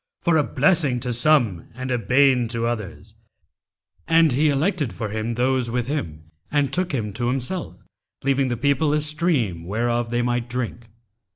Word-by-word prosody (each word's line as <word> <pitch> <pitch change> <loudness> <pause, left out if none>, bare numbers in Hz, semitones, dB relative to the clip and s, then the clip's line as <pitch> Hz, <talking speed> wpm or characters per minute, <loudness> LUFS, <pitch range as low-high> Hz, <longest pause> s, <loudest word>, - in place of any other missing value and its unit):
for 170 - +3
a 155 - +4
blessing 145 -3 +2
to 125 0 -3
some 120 - +2
and 130 +1 -5
a 125 - +1
bane 125 0 +3
to 115 0 -3
others; 115 -5 -5 0.9
and 165 -2 +4
He 150 +5 +2
elected 145 - 0
for 110 - -4
him 110 +2 -3
those 125 0 +1
with 120 0 -1
him 80 - -5 0.2
and 145 -2 +1
took 180 0 0
him 110 -7 -3
to 120 +3 -2
Himself, 135 +8 -2 0.5
leaving 135 0 +1
the 120 -2 -2
people 140 +4 +1
a 150 - +2
stream 150 - -1
whereof 120 +5 -1
they 120 +1 0
might 120 0 -1
drink. 120 -1 -4
125 Hz, 170 wpm, -23 LUFS, 115-145 Hz, 0.9 s, a